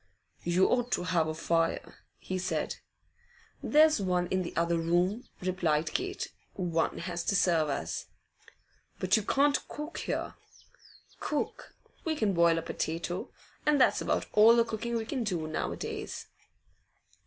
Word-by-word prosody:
'You 175 +2 +3
ought 245 0 +1
to - - 0
have 170 -3 +1
a 155 - -2
fire,' 165 +1 -1 0.2
he 185 0 -4
said. 185 - -2 0.8
'There's 305 -5 +5
one 180 -2 +1
in 185 - +1
the 175 - -5
other 170 0 +2
room,' 175 +7 +1
replied 170 -4 0
Kate. 380 +1 -3 0.2
'One 170 -3 0
has 175 0 -3
to 200 - +1
serve 165 -5 +3
us.' 85 - -3 0.9
'But 185 +2 +3
you 220 - +3
can't 280 +7 +3
cook 300 +3 -6
there.' - - -2 0.9
'Cook? 300 - -3 0.3
We 320 -1 0
can 215 -8 +1
boil 170 -1 +4
a 165 - -2
potato, 165 +2 -3 0.3
and 300 -1 +3
that's 255 - +4
about - - 0
all 220 +2 +8
the 235 -1 +4
cooking 230 +1 -3
we 225 -1 -1
can 250 +1 -2
do 180 -7 -1
now 155 - -2
a - - -5
days. - - -5
185 Hz, 155 wpm, -30 LUFS, 170-235 Hz, 0.9 s, all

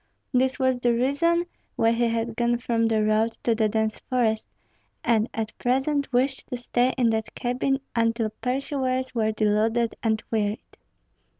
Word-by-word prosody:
This 260 +1 +2
was 260 -2 +1
the 240 -1 +2
reason 285 +8 +2 0.3
why 225 - +3
he 235 +1 +2
had 230 0 -2
gone 240 0 +1
from 230 -1 0
the 220 -1 +2
road 215 +2 +2
to 235 - +3
the 220 -1 +1
dense 220 0 -1
forest, 230 -4 0 0.5
and 230 -1 +2
at 225 0 -4
present 275 +3 0
wished 260 +2 0
to 250 - -4
stay 245 +1 +1
in 240 -3 +3
that 220 -1 -3
cabin 255 +2 0 0.2
until 230 -1 +1
pursuers 260 0 -1
were 220 -2 +1
deluded 220 +2 +1
and 220 -1 0
wearied. 210 -1 -2
235 Hz, 160 wpm, -25 LUFS, 220-255 Hz, 0.5 s, why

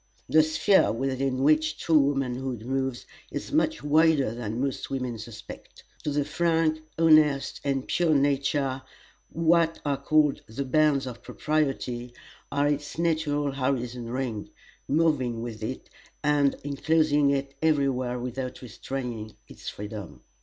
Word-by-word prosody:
The 155 - +6
sphere 155 +6 +3
within 130 +2 -1
which 155 +1 +3
true 160 0 +3
womanhood 130 -4 -1
moves 130 -1 -2 0.2
is - - -6
much 125 - +1
wider 150 -5 +3
than 115 -1 -4
most 135 0 -2
women 125 -4 -3
suspect. 110 0 -11 0.2
To - - -1
the 145 -1 0
frank, 160 0 +1 0.2
honest, 155 -4 +4
and 135 -2 -1
pure 170 -3 +2
nature, 140 -1 +1 0.5
what 165 0 +2
are 140 -1 +1
called 150 0 +3
"the 125 +6 -4
bounds 145 0 +3
of 125 -2 -7
propriety" 130 -5 -2 0.4
are 145 +1 +2
its 145 +1 -2
natural 155 -4 0
horizon 125 -3 -2
ring, 120 -4 -3 0.4
moving 135 -7 +1
with 115 -2 -6
it, 125 +4 -5 0.3
and 145 -1 +3
inclosing 145 0 +2
it 140 0 -1
every 150 -3 +3
where 125 -2 -1
without 125 +1 -5
restraining 120 -2 -6
its - - -8
freedom. 105 -2 -8
140 Hz, 130 wpm, -27 LUFS, 125-155 Hz, 0.5 s, The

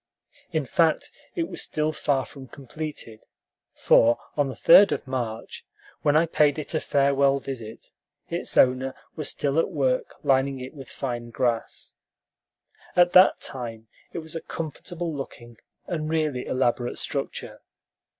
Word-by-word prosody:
In - - -1
fact, - - +1 0.2
it 335 -2 -1
was - - -2
still 155 0 0
far 140 -3 0
from 135 -2 -12
completed; 140 -4 -8 0.5
for 115 +1 +4 0.2
on 145 -2 +2
the 130 - -6
3d 200 +4 +7
of - - -2
March, 120 -4 -4 0.4
when 145 0 +3
I 165 - +4
paid 150 -3 +2
it 155 - -4
a 155 - +1
farewell 140 -1 +2
visit, 115 -5 -8 0.4
its - - -2
owner 130 +1 +3 0.2
was 155 -3 -2
still 145 +2 0
at - - +1
work 135 -7 0
lining 135 0 +2
it 130 +3 -8
with 135 -4 -11
fine 120 -3 -4
grass. 120 -1 -2 1.0
At 175 0 +5
that 185 +1 +7
time 115 -4 -5 0.2
it - - -7
was 160 - -6
a 165 - -3
comfortable 165 +1 -5
looking 120 -4 -8 0.3
and 155 -4 -3
really 155 -5 -1
elaborate 120 -1 0
structure. - - -4
135 Hz, 145 wpm, -25 LUFS, 125-155 Hz, 1.0 s, 3d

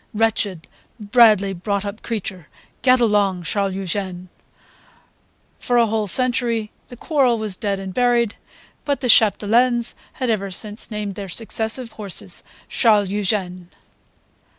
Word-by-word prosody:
Wretched, 210 -6 0 0.3
badly 210 -2 +4
brought 200 +3 -3
up 200 +2 -6
creature! 190 -7 -5 0.3
Get 255 -1 +4
along, 205 -5 +1
Charles 195 +1 -1
Eugene!" 185 -1 -4 1.3
For 245 - 0
a 235 - +5
whole 220 -1 -1
century 235 0 +2 0.2
the 245 - -12
quarrel 260 -4 +1
was 215 -3 -3
dead 200 0 -2
and 190 -1 -7
buried; 240 -2 +1 0.5
but 285 -1 -2
the 250 - -1
Chapdelaines 230 +3 +3 0.3
ever 220 -6 -1
since 210 +3 -3
had - - -16
named 210 -2 -4
their 195 0 -7
successive 225 +4 -2
horses 205 -4 -1 0.2
Charles 210 -5 +3
Eugene. 185 -3 -2
210 Hz, 130 wpm, -20 LUFS, 195-235 Hz, 1.3 s, a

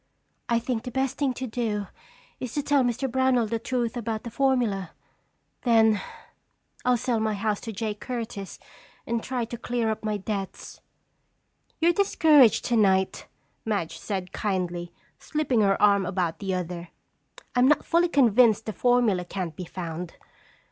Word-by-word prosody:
"I 235 - +3
think 235 0 -2
the 250 - -6
best 265 +1 -2
thing 280 -3 +2
to 260 - -4
do 220 -4 -2 0.5
is 255 - -5
to 290 - 0
tell 285 -1 +3
Mr. 245 +2 0
Brownell 260 -1 +2
the 225 +1 -2
truth 240 0 -2
about 225 -2 -3
the 235 - -7
formula. 235 -9 0 0.7
Then 220 -4 +4 0.8
I'll 250 -1 +3
sell 235 -1 0
my 220 -1 0
house 205 0 -1
to 225 - -5
Jake 215 0 -4
Curtis 225 -6 -5 0.5
and 235 0 -1
try 250 -1 -2
to 235 0 -7
clear 235 -2 -1
up 220 - -5
my 215 -1 -1
debts." 200 -1 -5 1.0
"You're 340 +1 +4
discouraged 310 - +5
tonight," 195 -5 +2 0.4
Madge 205 -7 -2
said 190 -3 -4
kindly, 180 -4 -2 0.3
slipping 295 -7 0
her 195 -1 +3
arm 200 -2 +4
about 180 -3 -1
the 195 -2 -2
other. 175 -1 -5 0.7
"I'm 250 +1 +5
not 300 - +3
fully 340 +1 +3
convinced 235 -6 +4
the 215 - -4
formula 240 -7 +2
can't 175 -3 -5
be 180 - -6
found. 170 -1 -6
225 Hz, 155 wpm, -26 LUFS, 195-250 Hz, 1.0 s, discouraged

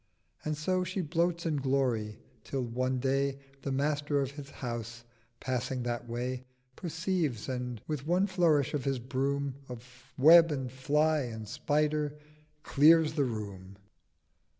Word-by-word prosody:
And 155 -1 -2
so 185 +4 0
She 185 +2 -2
bloats 170 +2 0
in 155 -3 0
Glory: 130 -6 0 0.3
till 135 -2 -3
one 130 +2 -1
Day 135 +1 0 0.2
The 140 - -3
Master 145 +1 0
of 140 0 -2
the 140 -2 -9
House, 120 -1 -6 0.4
passing 130 0 -2
that 120 0 -3
way, 125 +2 -3 0.3
Perceives, 165 - -2
and 125 -3 -3
with 150 -2 -4
one 180 +3 +3
flourish 170 -8 +2
of 145 -3 -1
his 135 -1 0
Broom 135 +2 -2
Of 125 0 -12
Web 165 +4 +8
and 135 -4 -3
Fly 150 +4 +2
and 110 -5 -5
Spider 150 +5 0 0.5
clears 155 +2 +5
the 145 -3 +1
Room. 100 -5 -6
135 Hz, 140 wpm, -30 LUFS, 125-155 Hz, 0.5 s, Web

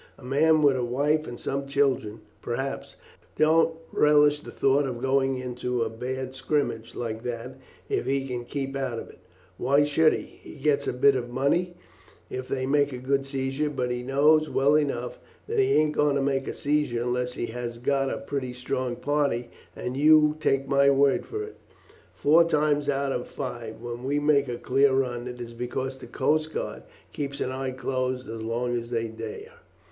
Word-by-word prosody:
A - - -16
man 155 +4 +3
with 140 -2 +5
a 125 - -1
wife 145 +6 +1
and 120 - -7
some 140 0 -3
children, 130 -6 0 0.2
perhaps, 135 +3 -4 0.4
don't 160 +1 +4 0.2
relish 150 0 +4
the - - -11
thought 140 +1 +2
of 120 -2 -4
going 135 0 +1
into 125 -1 -2
a - - -3
bad 130 +3 -4
scrimmage 130 -4 -2
like 110 -2 -4
that 125 +2 -6 0.3
if - - -1
he 135 0 0
can 120 -2 -4
keep 135 +1 -4
out 130 -4 -2
of - - -7
it; - - -20 0.4
why 140 +4 +4
should 155 +2 +4
he? - - -3
He - - -14
gets 145 0 +1
a - - 0
bit 135 +2 +4
of 120 -2 -3
money 145 +8 0 0.6
if 130 0 -4
they 130 -1 -2
make 145 +1 +2
a 125 - -5
good 135 +2 0
seizure, 135 +2 -1
but 125 -4 -2
he 125 0 -2
knows 150 +4 +3
well 140 +2 +3
enough 135 -5 -1 0.3
that 450 0 -1
he 400 - +3
ain't 155 0 +3
going 150 -1 +2
to 140 - +1
make 135 -1 0
a - - -4
seizure 145 -5 0
unless 125 0 -1
he 120 - -3
has 120 0 -5
got 135 +3 0
a - - -2
pretty 135 -3 -4
strong 125 0 -3
party; 140 -4 -1 0.2
and 125 - -4
you 150 +1 +5
take 135 -3 +1
my 140 0 +4
word 140 0 +3
for 425 +1 -4
it, 430 - -10 0.6
four 160 +4 +5
times 150 -3 +1
out 140 -1 0
of 125 -2 -3
five 120 -4 -6
when 120 0 -6
we 140 +2 0
make 145 -1 +3
a 120 -1 -3
clear 135 +2 +3
run, 125 -2 -1
it 125 0 -7
is 120 -1 -7
because 130 +2 -4
the - - -10
coast 155 +1 0
guard - - -4 0.3
keep 140 -1 -4
an 130 - -1
eye 130 0 -3
closed 130 0 -2
as 115 0 -6
long 120 +2 -1
as 115 0 -4
they 115 -1 -1
dare. 430 - -8
135 Hz, 195 wpm, -26 LUFS, 125-145 Hz, 0.6 s, with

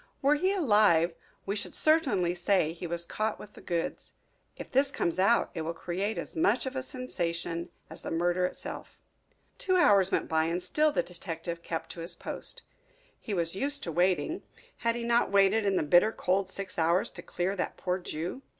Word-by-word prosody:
Were 280 +2 +5
he 370 +6 +2
alive 205 - +4 0.3
we 200 - -1
should 210 - -4
certainly 255 - +2
say 175 -2 +1
he 175 +1 -6
was 170 0 -2
caught 215 +4 -2
with 210 - -12
the - - -13
goods. 170 -1 -3 0.4
If - - -8
this 275 +2 +4
comes 170 -9 -1
out 230 +5 +3
it 165 - -3
will 165 +1 -3
create 190 +6 -2
as - - -5
much 210 +10 +2
of 260 +1 -4
a 260 - -1
sensation 170 -10 -3 0.2
as - - -9
the - - -5
murder 175 +2 +1
itself." - - -9 0.6
Two 370 - +1
hours 200 - +5
went - - 0
by 160 0 +2
and 170 +2 -2
still 305 0 +2
the 230 - +1
detective 170 -1 -6
kept 165 -1 -4
to - - -9
his 165 +2 -2
post. - - -4 0.6
He 210 - -4
was 170 0 0
used 280 +6 0
to 170 - -3
waiting 185 - +1 0.4
had 230 0 0
he 240 - -3
not 235 0 +2
waited 200 +2 +4
in 195 - +2
the - - +2
bitter 175 +8 +5
cold 190 -1 0
six 195 -2 -5
hours 170 +4 +2
to - - -9
clear 185 +3 -2
that 185 - -3
poor 180 0 -1
Jew? 175 - -5
185 Hz, 195 wpm, -29 LUFS, 170-230 Hz, 0.6 s, Were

